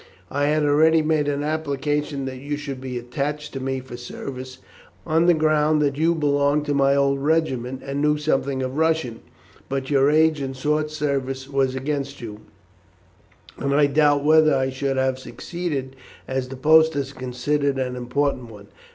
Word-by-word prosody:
I 145 +1 0
had 150 +1 +2
already 155 +2 +4
made 155 -1 +1
an 145 0 -1
application 145 -2 -2
that 130 -1 -6
you 145 +2 -4
should 140 -3 -6
be 130 -1 -5
attached 145 +5 -4
to 135 - -4
me 135 0 -2
for 125 -1 -10
service, 130 +1 -7 0.5
on 165 +2 +2
the 175 - +6
ground 155 0 +2
that 140 -1 0
you 165 +3 +2
belonged 145 -1 +1
to 145 - 0
my 140 0 +3
old 140 0 +2
regiment, 135 -4 -1
and 140 +1 -3
knew 150 0 +2
something 135 -3 0
of 130 +2 -4
Russian; 160 -8 0 0.5
but 135 0 -3
your 140 0 +4
age 155 0 +3
and 135 -1 -4
short 150 +3 0
service 135 -3 -2
were 135 -1 +2
against 140 +1 -3
you, 105 -3 -8 1.2
and 140 0 0
I 145 0 +5
doubt 145 0 +3
whether 155 -1 +5
I 130 0 0
should 135 +1 -2
have 130 0 0
succeeded, 145 -3 -5 0.3
as 130 -1 -2
the 135 - -7
post 160 +3 +5
is 140 -1 -3
considered 135 +2 -1
an 125 -1 -2
important 125 0 -1
one. 100 -2 -13
140 Hz, 175 wpm, -23 LUFS, 130-150 Hz, 1.2 s, the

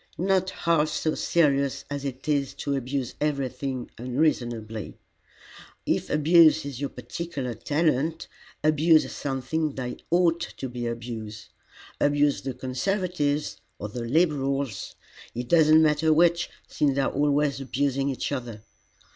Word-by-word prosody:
"Not 190 +1 +1
half 165 -4 +1
so 155 0 -1
serious 140 -5 +1
as 145 0 -5
it 135 +1 -6
is 140 -3 0
to 140 - -2
abuse 130 -1 -3
everything 135 -3 -2
unreasonably. 120 -5 -1 0.9
If - - 0
abuse 160 0 +5
is 140 -2 -6
your 140 - -1
particular 130 +1 -5
talent, 155 +5 0 0.4
abuse 155 +1 +4
something 140 +3 -2
that 125 -2 -5
ought 170 -1 +3
to 135 - -5
be 120 -1 -4
abused. 115 -2 -6 0.5
Abuse 145 0 +2
the 135 -2 -4
Conservatives 150 +2 -1 0.2
or 105 - -5
the 120 +3 -5
Liberals 140 - 0 0.4
it 120 +1 -4
does 160 +1 +5
not 155 +1 +7
matter 155 0 +3
which, 170 +2 +3 0.2
since 140 -3 +1
they 140 - +2
are 135 - 0
always 145 0 +1
abusing 135 +1 0
each 135 - -3
other. 120 -6 -5
140 Hz, 130 wpm, -26 LUFS, 125-155 Hz, 0.9 s, not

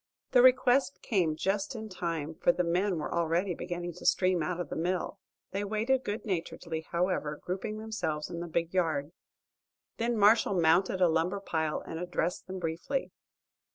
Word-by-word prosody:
The 250 - +6
request 255 +2 +4
came 175 -8 +1
just 195 - -1
in 220 -1 -5
time, 165 -5 -3
for 170 - +3
the 180 - 0
men 180 +2 +1
were 150 - -3
already 170 +3 +1
beginning 175 0 -4
to - - -11
stream 185 -2 +3
out 180 +2 -2
of 175 -5 -4
the - - -4
mill. 175 +2 -2 0.3
They 200 +1 -2
waited 225 +6 +1
good 205 +2 -4
naturedly, 165 -4 -3
however, 170 -4 0
grouping 190 +4 -3
themselves 180 -9 -3
in 170 - -6
the 175 - -4
big 170 +1 -1
yard. 160 -5 0 0.9
Then 235 0 0
Marshall 205 -2 +5
mounted 175 +3 +3
a 180 - +7
lumber 165 +4 +1
pile 160 -5 -1
and 160 - -6
addressed 175 0 -2
them 190 0 -5
briefly. 175 +11 -2
180 Hz, 170 wpm, -30 LUFS, 165-205 Hz, 0.9 s, a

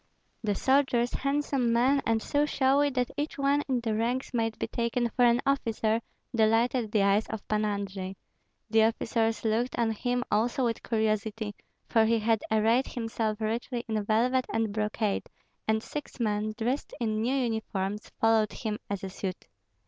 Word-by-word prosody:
The 205 -2 0
soldiers, 260 -1 +2
handsome 275 -3 0
men 260 +4 +3
and 225 -1 +1
so 290 0 +1
showy 280 +1 +3
that 250 -2 -1
each 295 +2 -2
one 280 +1 +2
in 255 -3 0
the 225 -2 -1
ranks 240 +4 -1
might 225 -2 0
be - - -1
taken 235 0 -1
for 245 +2 +1
an 235 0 +4
officer, 230 -5 +1 0.3
delighted 225 +1 +2
the 210 -2 +3
eyes 200 +2 +3
of 220 -2 -6
Pan 215 0 +1
Andrei. 195 -2 -3 0.5
The 220 0 +4
officers 225 0 0
looked 230 +3 0
on 230 -1 +2
him 245 +3 -1
also 240 +4 +2
with 230 -1 -1
curiosity, 220 -1 -1 0.3
for 225 -1 +4
he 230 +1 +3
had 225 0 +1
arrayed 225 +4 +3
himself 225 -2 -2
richly 235 +2 -2
in 215 -2 -1
velvet 245 +5 +2
and 225 -2 0
brocade, 210 -1 -1 0.4
and 220 0 +1
six 295 -2 -7
men, 215 -1 0
dressed 245 +5 -2
in 220 -2 0
new 250 +4 +1
uniforms, 215 -5 -2
followed 225 -1 +3
him 215 -3 -3
as 200 -1 -3
a 190 - -3
suite. 185 -1 -5
225 Hz, 165 wpm, -28 LUFS, 215-245 Hz, 0.5 s, an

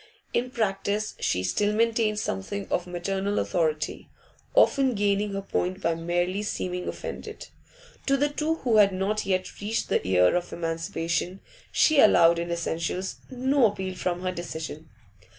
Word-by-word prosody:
In 245 +1 0
practice 210 -2 -1
she 90 - 0
still 205 - +1
maintained 225 -1 +2
something 195 - -3
of 175 - 0
maternal 195 +3 -2
authority, 160 -4 -1 0.5
often 265 -3 +4
gaining 205 0 +1
her 195 0 -3
point 185 -1 -1
by 170 -3 +1
merely 175 +4 -1
seeming 180 -3 -3
offended. - - -6 0.6
To 275 0 +4
the 290 +2 +2
two 305 +2 -1
who 240 -8 +1
had 200 -2 +6
not 195 +3 -1
yet 185 0 -2
reached 220 +3 -2
the - - +2
year 90 - +4
of 175 0 -2
emancipation 165 +2 -2 0.3
she 310 -2 +4
allowed, 170 -7 +6
in 170 0 -3
essentials, 170 +2 -2
no 260 0 +3
appeal 190 -2 -4
from 180 -1 -2
her 185 - 0
decision. 160 -3 -6
190 Hz, 150 wpm, -26 LUFS, 170-215 Hz, 0.6 s, had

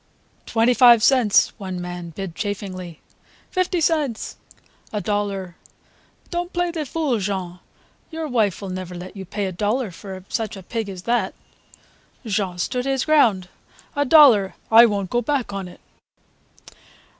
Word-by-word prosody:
"Twenty 230 +2 +3
five 240 -3 +7
cents!" 250 -7 +4
one 190 -2 -5
young 180 - -5
man 175 -1 -6
bid 175 +1 -6
chaffingly. 185 -4 -5 0.5
"Fifty 370 -1 0
cents!" 300 -8 0 0.6
"A 210 - -2
dollar!" 200 -4 -3 0.7
"Don't 350 0 -3
play 350 0 -1
the 315 -4 -4
fool, 285 -6 -1
Jean. 185 -3 -3 0.5
Your 320 -1 -4
wife 215 - 0
will 190 - -5
never 185 -1 -6
let 180 +3 -9
you 195 -1 -7
pay 205 +3 -3
a 190 - -3
dollar 210 +4 -1
for 190 +1 -9
such 220 -3 -3
a 190 - -10
pig 220 +2 -4
as 185 -2 -8
that." 240 +3 0 0.9
Jean 195 -4 -1
stood 250 +8 -2
his 270 -2 0
ground: 230 - +3 0.5
"A 285 - +2
dollar, 260 -10 +6 0.2
I 230 +1 +9
won't 200 -3 -2
go 240 - +1
back 255 -3 -1
on 195 -2 -4
it." 180 - -14
210 Hz, 155 wpm, -22 LUFS, 185-255 Hz, 0.9 s, I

